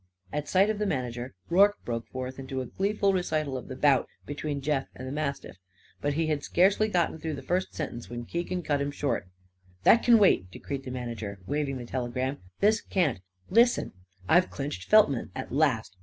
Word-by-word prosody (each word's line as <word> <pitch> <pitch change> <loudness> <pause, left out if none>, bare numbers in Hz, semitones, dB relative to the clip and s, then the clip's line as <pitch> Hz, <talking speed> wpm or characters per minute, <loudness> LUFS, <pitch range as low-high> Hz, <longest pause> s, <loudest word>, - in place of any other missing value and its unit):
At 150 0 -3
sight 195 +3 +4
of 210 - -4
the 210 - 0
manager 125 - -3
Rorke 200 +3 +5
broke 115 -1 -3
forth 130 0 -6
into 130 0 -4
a 130 - -3
gleeful 200 - 0
recital 155 -6 -1
of 130 - -6
the 130 - -6
bout 135 -2 +3 0.2
between 145 0 -3
Jeff 140 -1 -1
and 130 - -7
the - - -4
mastiff. 140 -7 -3 0.4
But 145 0 0
he 165 +1 +1
had 155 -2 0
scarcely 195 +4 +3
gotten 175 -5 0
through 155 -1 -3
the 140 - -8
first 185 +2 -1
sentence 130 -6 -5
when 120 0 -6
Keegan 175 +4 -3
cut 145 -2 0
him 140 - -1
short. 140 -8 -2 0.6
"That 230 - +6
c'n 235 -1 +7
wait!" 185 - +4
decreed 135 +8 -6
the - - -5
manager, 115 -5 -5
waving 140 +2 -1
the 120 - -7
telegram. 130 +2 -2 0.2
"This 220 +2 +4
can't. 160 - 0 0.3
Listen! 235 +4 +4 0.4
I've 180 - +4
cinched 135 -10 -5
Feltman, 205 - +5
at - - -5
last. 130 -8 +1
145 Hz, 190 wpm, -28 LUFS, 130-180 Hz, 0.6 s, c'n